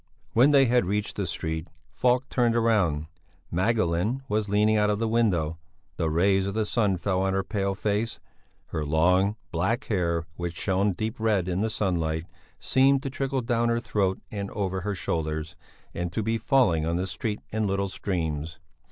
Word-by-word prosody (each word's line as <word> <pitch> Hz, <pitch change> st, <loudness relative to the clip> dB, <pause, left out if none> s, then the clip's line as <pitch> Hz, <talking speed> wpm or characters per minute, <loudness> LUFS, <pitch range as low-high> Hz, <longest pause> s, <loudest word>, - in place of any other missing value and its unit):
When 125 Hz, +5 st, +6 dB
they 140 Hz, -2 st, +6 dB
had 120 Hz, -5 st, +2 dB
reached 105 Hz, +1 st, -1 dB
the 100 Hz, -3 st, -2 dB
street, 80 Hz, -1 st, -3 dB, 0.3 s
Falk 125 Hz, +1 st, +2 dB
turned 120 Hz, -2 st, +2 dB
round. 100 Hz, -10 st, +2 dB, 0.5 s
Magdalene 105 Hz, +4 st, +1 dB
was 105 Hz, 0 st, -1 dB
leaning 105 Hz, +2 st, +3 dB
out 105 Hz, -1 st, +3 dB
of 105 Hz, -, +1 dB
the 115 Hz, +1 st, 0 dB
window; 90 Hz, -9 st, +1 dB, 0.4 s
the 80 Hz, -, 0 dB
rays 95 Hz, +4 st, +2 dB
of 100 Hz, -, -3 dB
the 110 Hz, -1 st, +1 dB
sun 105 Hz, -3 st, +1 dB
fell 95 Hz, +1 st, 0 dB
on 95 Hz, 0 st, +1 dB
her 95 Hz, 0 st, +1 dB
pale 100 Hz, 0 st, -1 dB
face; 105 Hz, +4 st, -1 dB, 0.5 s
her 80 Hz, -, -2 dB
long, 90 Hz, +7 st, +3 dB, 0.2 s
black 100 Hz, -, 0 dB
hair, 85 Hz, -5 st, 0 dB
which 85 Hz, -1 st, -4 dB
shone 95 Hz, +1 st, +1 dB
deep 110 Hz, +5 st, -4 dB
red 105 Hz, -5 st, +1 dB
in 90 Hz, +1 st, -1 dB
the 110 Hz, -, +1 dB
sunlight, 85 Hz, -6 st, -1 dB, 0.3 s
seemed 135 Hz, +1 st, +3 dB
to 135 Hz, -, -3 dB
trickle 135 Hz, -1 st, -1 dB
down 120 Hz, 0 st, +1 dB
her 115 Hz, 0 st, +1 dB
throat 95 Hz, -4 st, 0 dB
and 100 Hz, -2 st, -4 dB
over 95 Hz, -2 st, -2 dB
her 105 Hz, +2 st, -2 dB
shoulders 80 Hz, -2 st, -3 dB, 0.4 s
and 85 Hz, 0 st, -3 dB
to 110 Hz, -, -1 dB
be 115 Hz, +2 st, 0 dB
falling 110 Hz, -, +3 dB
on 85 Hz, +1 st, 0 dB
the 90 Hz, +2 st, 0 dB
street 105 Hz, +2 st, -3 dB
in 110 Hz, -1 st, 0 dB
little 100 Hz, 0 st, 0 dB
streams. 80 Hz, -5 st, -3 dB
100 Hz, 180 wpm, -26 LUFS, 85-110 Hz, 0.5 s, When